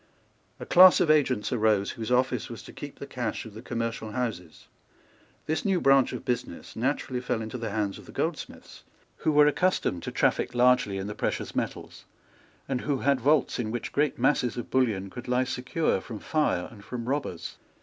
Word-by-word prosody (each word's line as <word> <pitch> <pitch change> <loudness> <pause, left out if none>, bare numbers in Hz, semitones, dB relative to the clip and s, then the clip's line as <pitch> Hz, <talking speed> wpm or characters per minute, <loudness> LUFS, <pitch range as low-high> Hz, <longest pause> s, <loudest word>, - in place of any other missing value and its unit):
A - - -6
class 185 +1 +8
of 155 - +4
agents 130 -8 +2
arose, 110 -4 +2
whose 115 0 -5
office 125 +1 +1
was - - -8
to - - -12
keep - - -9
the - - -7
cash - - -4
of 110 - -10
the 110 - -9
commercial 115 -3 -4
houses. 105 -10 -4 0.8
This 155 - -1
new 195 -3 +2
branch 135 -3 +4
of - - -6
business 120 -8 -4
naturally 130 0 -1
fell 125 -2 -1
into 110 +3 -5
the 115 -1 -3
hands 105 -2 -2
of - - -14
the - - -10
goldsmiths, - - -5 0.3
who 155 - 0
were 150 0 +6
accustomed 150 - +1
to - - -5
traffic - - +1
largely 125 -5 +3
in 95 - -4
the 105 - -4
precious - - -3
metals, - - -4 0.6
and 130 -2 -1
who 140 -2 -1
had 140 -2 +2
vaults 145 0 +2
in 110 -3 -2
which 120 +2 -4
great 150 +1 +1
masses 125 -3 +1
of 120 - -6
bullion 105 -7 +1
could 125 - -8
lie 125 +1 +2
secure 130 - -1
from 115 -3 -7
fire 150 - 0
and 105 -3 -13
from 120 +1 -6
robbers. 135 - -3
125 Hz, 190 wpm, -27 LUFS, 110-135 Hz, 0.8 s, class